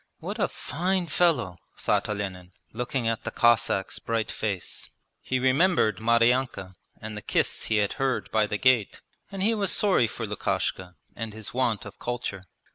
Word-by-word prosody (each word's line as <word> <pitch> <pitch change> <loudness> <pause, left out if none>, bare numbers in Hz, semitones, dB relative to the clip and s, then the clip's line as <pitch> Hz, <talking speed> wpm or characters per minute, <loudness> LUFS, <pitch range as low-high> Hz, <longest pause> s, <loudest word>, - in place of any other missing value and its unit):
'What - - -6
a - - +3
fine 180 +5 -1
fellow!' 145 - +1 0.2
thought - - 0
Olenin, 95 -3 -4 0.2
looking 125 +1 -2
at 115 -1 -1
the - - -2
Cossack's 120 -4 +2
bright 115 -1 -1
face. 100 -5 -4 0.3
He 130 - -1
remembered 130 - +3
Maryanka 115 -3 +2 0.3
and 110 0 -7
the 105 - -6
kiss - - 0
he 110 - 0
had 100 -1 +1
heard 135 -2 0
by 110 -1 +3
the 105 - -1
gate, 125 -3 +2 0.3
and 195 -1 -3
he 225 +3 +3
was 205 -3 0
sorry 190 - +4
for 115 +1 -5
Lukashka 95 -3 -2 0.2
and 115 -2 -5
his 110 -1 -8
want 120 -5 0
of 100 - -11
culture. 120 -6 -4
115 Hz, 165 wpm, -27 LUFS, 105-130 Hz, 0.3 s, sorry